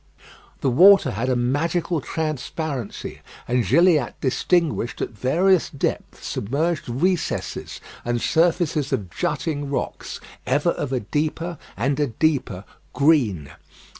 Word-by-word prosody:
The 135 - +2
water 180 +1 +7
had 115 +4 -2
a 130 - +2
magical 155 +6 0
transparency, 155 -5 -4 0.3
and 125 0 +2
Gilliatt 150 - +3
distinguished 150 -1 0
at - - -2
various 170 - +2
depths 140 - -3
submerged 145 +7 -1
recesses, 170 +8 -1 0.2
and 120 0 -1
surfaces 160 -2 +1
of 95 -5 -2
jutting 150 - -2
rocks 140 - -4 0.3
ever 145 +6 +2
of 145 - -4
a 130 -2 0
deeper 155 +7 -2 0.2
and 135 +7 0
a 145 - +2
deeper 125 - 0 0.3
green. 125 - +2
145 Hz, 115 wpm, -23 LUFS, 125-165 Hz, 0.3 s, water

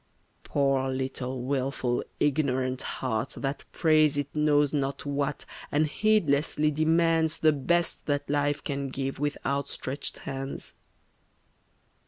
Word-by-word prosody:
Poor 135 -2 +1
little 130 -1 -3
wilful 130 -2 -1 0.2
ignorant 130 -3 +1
heart 115 -4 -3
that 135 0 -3
prays 155 -3 +4
It 145 0 -3
knows 150 -1 +3
not 140 -1 -1
what, 145 0 -2 0.3
and 150 +2 +3
heedlessly 155 -5 +2
demands 160 +1 +2
The 155 - +4
best 170 +5 0
that 145 -1 0
life 145 0 0
can 140 -1 -3
give 135 0 -3
with 145 0 -1
out 140 0 0
stretched 135 +3 -4
hands! 135 0 -5
140 Hz, 120 wpm, -28 LUFS, 135-150 Hz, 0.3 s, prays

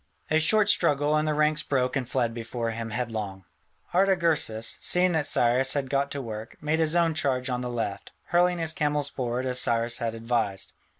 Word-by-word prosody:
A 155 - +4
short 210 +6 +3
struggle, 145 -6 +2
and 155 0 +1
the 155 - +1
ranks 150 0 +2
broke 130 -2 -1
and 130 -3 -2
fled 120 -3 0
before 115 0 -4
him 115 0 -5
headlong. 110 -5 -4 0.5
Artagersas, 170 - +1
seeing 180 0 +2
that 160 -3 +1
Cyrus 125 +2 +3
had 135 -3 -3
got 140 0 0
to 140 -1 -5
work, 110 -1 -8
made 150 +2 -1
his 160 0 +2
own 170 -2 +3
charge 130 -4 0
on 125 0 -2
the 125 - -4
left, 110 -5 -4 0.2
hurling 175 0 +3
his 165 -1 0
camels 150 -2 -1
forward 125 -1 -3
as 125 0 +2
Cyrus 115 +1 +1
had 115 -1 -3
advised. 115 -4 -1
130 Hz, 190 wpm, -26 LUFS, 115-155 Hz, 0.5 s, A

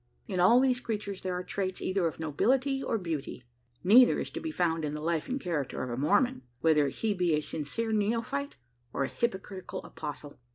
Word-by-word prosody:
In 185 -4 -2
all 190 +8 +7
these 255 -1 +3
creatures 205 -5 -4
there 185 -1 -2
are 180 - -3
traits 185 0 -3
either 185 -2 0
of 160 - -5
nobility 255 - +1
or 260 - 0
beauty. 160 - -4 0.4
Neither 235 +7 +7
is - - -4
to - - -4
be 320 - -4
found 165 - 0
in 150 0 -2
the 150 - -5
life 165 -1 -1
and 260 +2 -1
character 155 - -2
of 125 - -4
a - - -2
Mormon 175 - +2 0.2
whether 150 -1 +4
he 210 +10 -1
be 180 -4 +2
a 150 - 0
sincere 160 +10 -3
neophyte 230 +7 -1 0.4
or 140 - 0
a - - 0
hypocritical 195 - -3
apostle. 145 -1 -7
185 Hz, 200 wpm, -30 LUFS, 155-230 Hz, 0.4 s, all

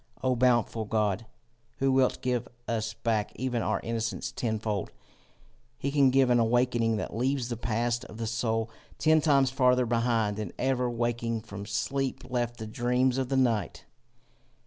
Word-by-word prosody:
O 130 -1 +2
bountiful 120 -2 +2
God, 105 0 0 0.5
who 135 0 +2
wilt 130 -1 +2
give 125 -2 0 0.2
us 110 -1 -2
back 110 -3 -1
even 125 -1 -1
our 110 -3 0
innocence 115 -4 -3
tenfold! 110 -4 -2 0.9
He 140 - -2
can 140 -2 +5
give 130 -1 +4
an 120 - +5
awaking 115 -1 +2
that 105 - -4
leaves 130 +1 0
the 120 - -2
past 115 +1 -1
of 110 - -11
the 115 - -3
soul 115 0 -1 0.3
ten 155 0 +4
times 140 -4 +3
farther 125 -1 +3
behind 115 -3 +1
than 105 -4 -5
ever 125 -2 +1
waking 120 -1 -1
from 100 -2 -8
sleep 135 +5 -2
left 120 -1 -2
the 110 - -6
dreams 125 +3 +1
of 130 -1 -2
the 135 - +1
night. 120 -5 0
120 Hz, 160 wpm, -28 LUFS, 110-130 Hz, 0.9 s, can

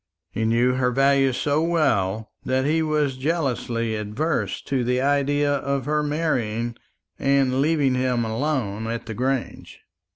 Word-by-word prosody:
He 110 - -2
knew 120 +3 +3
her 130 -1 +1
value 135 +1 +3
so 145 +4 0
well 110 - 0
that 130 +1 0
he 160 +3 +2
was 150 -4 0
jealously 130 -6 -1
averse 110 +10 -2
to 130 -3 -1
the 125 +1 +1
idea 145 +1 +2
of 140 -2 -2
her 150 +1 +1
marrying 120 -7 -1 0.4
and 135 -1 +2
leaving 145 -3 +2
him 125 -2 0
alone 110 -3 -2
at 115 0 -4
the 115 - -5
Grange. 130 +2 -3
130 Hz, 140 wpm, -23 LUFS, 115-145 Hz, 0.4 s, knew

